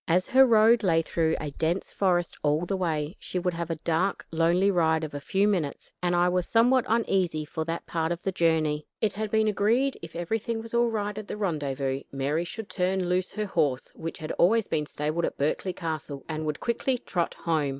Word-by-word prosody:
As 180 +2 +2
her 265 +1 +7
road 225 0 +5
lay 165 -4 +3
through 160 0 0
a 150 -2 -4
dense 165 +6 -2
forest 175 -3 +1
all 150 +3 +1
the 195 - -1
way, 160 -2 -1
she - - -5
would 180 0 0
have 170 0 -4
a 165 - -1
dark, 170 +5 -1
lonely 170 +4 +3
ride 160 -3 +2
of 155 - -5
a 145 - -4
few 195 +7 +1
minutes, 175 -9 -2
and 175 0 +1
I 175 0 +4
was 180 0 0
somewhat 245 +2 +4
uneasy 190 -8 +1
for 160 +1 -4
that 165 +1 -4
part 165 0 -1
of 170 0 -3
the 195 - 0
journey. 160 -4 +1
It 215 -2 +1
had 215 +1 -3
been 220 0 +2
agreed 230 +6 +2
that - - -14
if 160 - -13
everything 225 +6 -2
was 225 +1 -9
all 235 0 +3
right 210 -2 -2
at 215 - -8
the - - -5
rendezvous, 140 -8 -1
Mary 145 +5 -1
should 215 +4 -6
turn 185 -1 -1
loose 180 +1 0
her 215 +1 -2
horse, 150 -9 0
which 165 0 -6
had 155 - -5
always 220 +5 +4
been 150 -2 -1
stabled 155 +4 -1
at - - -4
Berkeley 155 +6 0
Castle 155 -5 -5
and 155 -1 -3
would 150 - -2
quickly 250 +2 0
trot 175 -7 -2
home. 155 -4 0
175 Hz, 220 wpm, -27 LUFS, 160-205 Hz, -, her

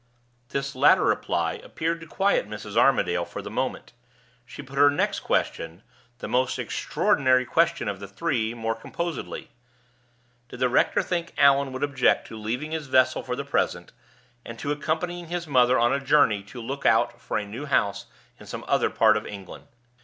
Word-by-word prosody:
This 140 0 -3
latter 130 - +5
reply - - 0
appeared 165 +1 -3
to 165 - -10
quiet 195 - +1
Mrs. 105 0 -7
Armadale - - +3
for - - -7
the - - -7
moment; - - -3 0.5
she - - -9
put 140 +1 -6
her 145 0 +7
next 145 - 0
question 80 +5 -2 0.3
the - - -6
most 130 +1 0
extraordinary 130 -1 +1
question 160 -2 +1
of 100 -2 -3
the 100 - -8
three 115 - -2
more 115 -1 -2
composedly: 170 +7 -5 1.0
Did 125 - -10
the 130 -1 +2
rector 120 - +2
think 170 -2 -3
Allan 140 -1 +4
would 130 +1 -4
object 140 -3 +2
to - - -8
leaving 120 +8 -4
his 160 -3 -4
vessel 130 -1 +3
for - - -4
the - - -5
present, - - -1 0.5
and 115 - -9
to 145 +5 -3
accompanying 170 +4 -2
his 175 +1 -3
mother 130 -3 +4
on 120 +2 +3
a 140 - +1
journey 135 -7 +3
to 120 +5 -10
look 135 +4 -5
out 120 +1 +2
for 115 - -3
a 105 - -3
new 115 +8 -7
house 105 -7 0 0.3
in - - -13
some - - -7
other - - +2
part 110 -1 +4
of 105 - -3
England? 100 -3 -10
130 Hz, 180 wpm, -25 LUFS, 115-145 Hz, 1.0 s, her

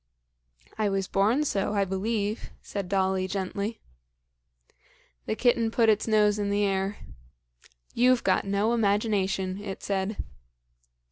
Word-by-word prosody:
"I 210 -1 +2
was 195 -1 -1
born 215 +9 +2
so, 205 -7 -1
I 200 -1 +2
believe," 205 +3 -2
said 200 -3 -5
Dolly 190 -1 +1
gently. 200 +3 -3 1.5
The - - 0
kitten 235 -1 +2
put 225 0 +3
its 215 +1 +2
nose 210 -1 +3
in 205 -1 -1
the 205 +1 +1
air. 195 0 0 1.0
"You've 250 +1 +3
got - - +2
no 200 +3 +1
imagination," 200 -3 0
it 195 -2 -6
said. 200 +1 -2
205 Hz, 125 wpm, -27 LUFS, 195-220 Hz, 1.5 s, put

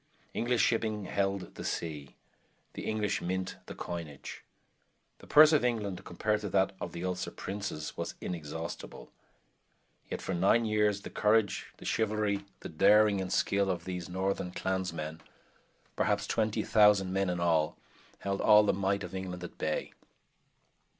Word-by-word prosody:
English 120 0 +1
shipping 110 -3 0
held 95 0 -1
the - - -8
sea; 75 -4 -4 0.6
the - - -6
English 105 -2 0
mint 95 +1 -3
the - - -7
coinage. 80 -5 -7 0.8
The - - -15
purse 155 +1 +8
of 150 - +4
England, 105 -7 -1
compared 105 +4 -1
to 105 - -3
that 95 0 +2
of 85 - -4
the 85 +2 -5
Ulster 90 0 -2
princes, 95 -6 -5
was - - -4
inexhaustible. 80 -1 -6 1.0
Yet - - -3
for 95 - -3
nine 100 +6 +3
years 105 -2 +2
the - - -7
courage, 105 -2 +2
the - - -12
chivalry, 105 -2 0 0.2
the - - -6
daring 105 +4 +5
and 95 - -4
skill 100 0 +2
of 85 -2 -2
these 90 -1 -5
northern 95 0 -2
clansmen, 85 -5 -3 0.7
perhaps - - +1
20,000 105 -3 +3
men 95 -1 +1
in 90 -1 -1
all, 80 -3 +2 0.4
held 100 0 -2
all 105 0 +7
the 105 - +2
might 100 +1 0
of 90 - -7
England 90 -1 -5
at 90 - -9
bay. 80 - -2
95 Hz, 150 wpm, -31 LUFS, 90-105 Hz, 1.0 s, purse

